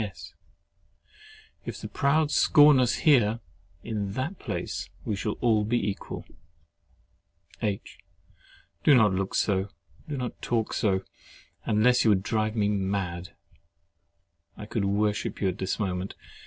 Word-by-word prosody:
S. 90 -6 -7 1.3
If - - -6
the - - -6
proud 145 +2 +1
scorn 145 -1 +6
us 125 -2 +2
here, 120 -7 +4 0.4
in 100 -3 -3
that 140 - -3
place - - -4 0.2
we 105 - -1
shall 105 +2 -2
all 110 -3 +3
be 120 +2 0
equal. - - -8 1.4
H. 105 -3 -3 0.8
Do 145 - +6
not 110 -5 +5
look 95 +1 -2
so—do 100 - -3
not 125 -2 -5
talk 115 -2 -1
so—unless 105 +3 0
you 115 - +4
would 95 -2 +3
drive 110 +1 -1
me 105 -2 +2
mad. 95 -3 -2 1.2
I 105 - -7
could 105 -1 -2
worship 105 +1 0
you 95 - +1
at 90 - -5
this 95 +3 -2
moment. 95 -2 -3
105 Hz, 130 wpm, -27 LUFS, 100-120 Hz, 1.4 s, scorn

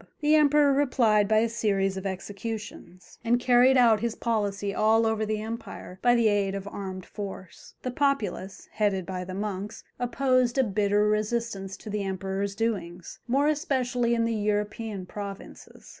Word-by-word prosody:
The 300 +1 +3
Emperor 295 -2 +5
replied 235 -7 +3
by 215 +1 +3
a 230 - +2
series 200 -4 0
of 190 +1 -4
executions, 200 -1 -7
and 240 +1 +2
carried 250 +1 +5
out 230 -4 +5
his 230 +1 -2
policy 205 -3 -1
all 220 +2 +3
over 220 -1 0
the 215 0 -1
empire 220 -4 -7
by 245 0 +4
the 235 -2 +3
aid 200 -2 +1
of 195 0 -5
armed 190 -2 -6
force. 195 -3 -9
The 255 - -2
populace, 240 -9 -1
headed 200 -4 0
by 185 -1 -4
the 185 0 -6
monks, 205 0 -4 0.2
opposed 255 0 +1
a 265 - +5
bitter 205 -1 +1
resistance 210 -2 -1
to 215 - -9
the 210 0 -1
Emperor's 195 +1 -3
doings, 190 -7 -3
more 275 +4 +2
especially 255 -6 0
in 230 0 +1
the 230 - 0
European 210 -1 -2
provinces. 200 +1 -9
215 Hz, 160 wpm, -27 LUFS, 195-235 Hz, 0.2 s, Emperor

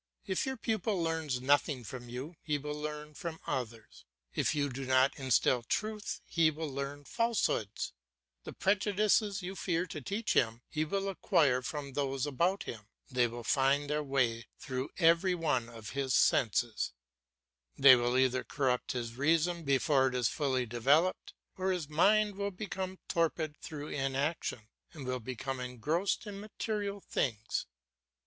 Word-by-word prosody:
If 190 +6 -1
your 265 0 -2
pupil 220 -3 -1
learns 160 -6 -1
nothing 140 -1 +2
from 120 +1 -8
you, 130 +8 -6
he 150 -2 0
will 150 +1 -4
learn 150 0 -5
from 165 +1 -6
others. 115 -4 -5 0.3
If - - +1
you 145 -1 +1
do 135 0 -5
not 130 +1 +4
instil 130 -1 +3
truth 215 - -3
he 165 -2 +3
will 155 -1 -4
learn 140 +1 -4
falsehoods; 230 - 0 0.5
the - - -7
prejudices 205 0 +2
you 190 +2 -5
fear 175 -1 0
to 155 -4 -7
teach 205 - -1
him 115 +1 +1
he 155 0 -1
will 195 +5 -1
acquire 160 -9 +2
from 140 +2 -5
those 135 -1 -1
about 170 +7 +1
him, 105 -3 -8 0.2
they 125 -1 +3
will 120 +1 -7
find 140 +4 +2
their 150 0 +1
way 130 -5 0
through 130 +1 -4
every 170 +2 +4
one 140 -9 0
of 115 -2 -9
his 135 -3 0
senses; 110 - +2 0.8
they 135 -1 +9
will 120 +1 +1
either 130 -1 +2
corrupt 130 -3 0
his 120 -2 -3
reason 165 +6 +2
before 140 -1 +3
it 130 - -2
is 125 -2 +2
fully 130 -4 0
developed 140 +10 +2 0.2
or 190 0 0
his 175 -5 -2
mind 205 +6 +3
will 200 0 -1
become 190 -1 -5
torpid 160 -2 0
through 150 -1 -6
inaction, 135 -1 -1 0.3
and 150 -5 -8
will 130 0 -2
become 130 +2 -4
engrossed 145 - -1
in 205 -1 -6
material 205 -1 -3
things. 110 - -2
145 Hz, 155 wpm, -32 LUFS, 130-180 Hz, 0.8 s, they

